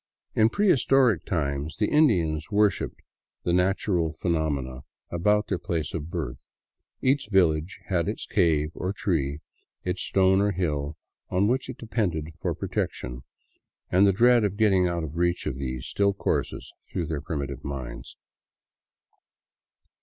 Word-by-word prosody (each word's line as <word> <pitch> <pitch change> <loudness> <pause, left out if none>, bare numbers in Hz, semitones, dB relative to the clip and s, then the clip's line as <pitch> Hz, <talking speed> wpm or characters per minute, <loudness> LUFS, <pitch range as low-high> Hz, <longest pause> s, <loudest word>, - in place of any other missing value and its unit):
In 110 0 +4
prehistoric 135 - +3
times 75 -2 -2
the 105 - +2
Indians 85 - +2
worshipped 105 -2 +1 0.4
the 85 - +1
natural 90 -2 +1
phenomena 75 -6 -1 0.3
about 105 +5 +2
their 95 - -1
place 85 -6 -3
of 80 -1 -4
birth; 75 -8 -5 0.5
each 135 -4 +2
village 85 -3 +2
had 90 -3 0
its 105 - -4
cave 80 -5 +2
or 95 +3 -3
tree, 80 -8 -1 0.4
its 90 0 -2
stone 95 0 +3
or 100 0 +2
hill, 75 -4 -2 0.3
on 95 +3 +2
which 130 +3 0
it 130 - -6
depended 90 -9 -2
for - - -1
protection; 60 0 -3 0.7
and 95 +3 +5
the - - +5
dread 120 +4 +5
of 100 -1 -1
getting 95 -4 +4
out 85 -1 -2
of 80 +1 -6
reach 85 0 +1
of 75 - -2
these 65 -1 -4
still 100 +9 +1
courses - - -2 0.2
through 85 - -2
their 75 -2 -3
primi 70 -2 -3
tive 70 -2 -7
minds. 65 -4 -6
85 Hz, 145 wpm, -26 LUFS, 75-100 Hz, 0.7 s, and